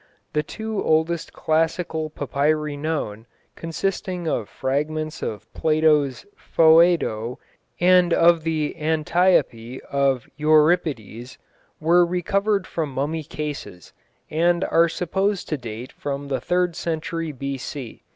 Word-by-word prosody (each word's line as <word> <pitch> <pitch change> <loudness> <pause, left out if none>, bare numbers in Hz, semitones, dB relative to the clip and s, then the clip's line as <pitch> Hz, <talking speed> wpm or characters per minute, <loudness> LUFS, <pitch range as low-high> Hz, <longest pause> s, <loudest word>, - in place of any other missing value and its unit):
The 150 - +2
two 220 +6 -4
oldest 160 +1 +1
classical 160 0 -1
papyri 150 +1 -1
known, 145 -8 -3 0.3
consisting 180 +1 -3
of 115 -9 -1
fragments 150 +4 -2
of 105 - -6
Plato's 155 -3 +2
Phoedo 160 -8 +3 0.4
and 180 0 +5
of 170 0 +5
the 155 -2 -1
Antiope 155 -6 +1
of 135 -3 +1
Euripides, 150 - +1 0.4
were 170 +3 +4
recovered 195 +3 0
from 155 -4 -3
mummy 150 +4 -2
cases, 145 - -7 0.4
and 170 +3 +2
are 170 0 +3
supposed 190 +4 -1
to 155 - -1
date 120 +1 -7
from 140 0 -5
the 130 -3 -1
third 180 +1 0
century 165 0 -3
B.C. 135 -2 -6
155 Hz, 110 wpm, -23 LUFS, 140-170 Hz, 0.4 s, and